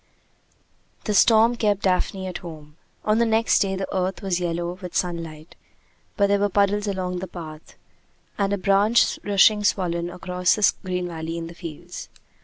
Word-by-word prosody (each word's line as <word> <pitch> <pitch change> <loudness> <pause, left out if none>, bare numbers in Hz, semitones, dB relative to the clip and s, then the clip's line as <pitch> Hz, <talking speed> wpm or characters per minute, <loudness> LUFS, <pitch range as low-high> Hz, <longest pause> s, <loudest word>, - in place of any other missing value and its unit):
The 210 - -1
storm 225 +4 +5
kept 205 -3 0
Daphne 190 0 0
at 185 - -5
home. 155 -3 -11 0.3
On 215 +1 +2
the 235 - +4
next 225 0 +3
day 195 -1 0
the 190 0 -3
earth 185 +2 -2
was 185 -2 0
yellow 175 +1 -3
with 180 -2 -8
sunlight, 165 -3 -4 0.6
but 200 - +4
there 200 0 +2
were 205 0 +1
puddles 205 +1 +1
along 185 -2 -2
the 190 - -5
path, 160 -3 -10 0.6
and 200 -1 0
a 200 - +1
branch 200 +4 +3
rushing 205 +1 +4
swollen 175 -4 0
across 180 0 0
the 210 - +3
green 180 -1 -2
valley 165 -1 -5
in 165 - -5
the 165 - -9
fields. 170 0 -9
185 Hz, 170 wpm, -23 LUFS, 175-200 Hz, 0.6 s, storm